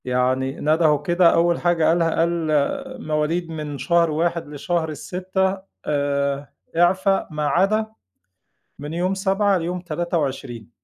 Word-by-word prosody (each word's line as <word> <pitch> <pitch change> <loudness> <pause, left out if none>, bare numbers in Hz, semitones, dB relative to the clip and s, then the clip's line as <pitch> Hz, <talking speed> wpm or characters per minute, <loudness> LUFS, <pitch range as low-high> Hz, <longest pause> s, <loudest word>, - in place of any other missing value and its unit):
يعني 130 +2 0
ندهوا 155 0 +3
كده 175 +1 +4
أول 170 0 +2
حاجة 175 -2 +2
قالها 165 0 +3
قال: 165 +1 +2 0.8
"مواليد 155 +3 0
من 150 -3 -5
شهر 170 +4 +2
1 170 +1 -1
لشهر 160 +2 -2
6 190 +5 -2 0.3
آآ 140 -1 -1 0.2
إعفا 190 +3 +3
ما 150 -1 -1
عدا 200 +7 +2 0.9
من 145 +2 -6
يوم 180 +3 0
7 195 0 +1
ليوم 175 +2 -3
23." 145 - -3
165 Hz, 120 wpm, -22 LUFS, 145-180 Hz, 0.9 s, كده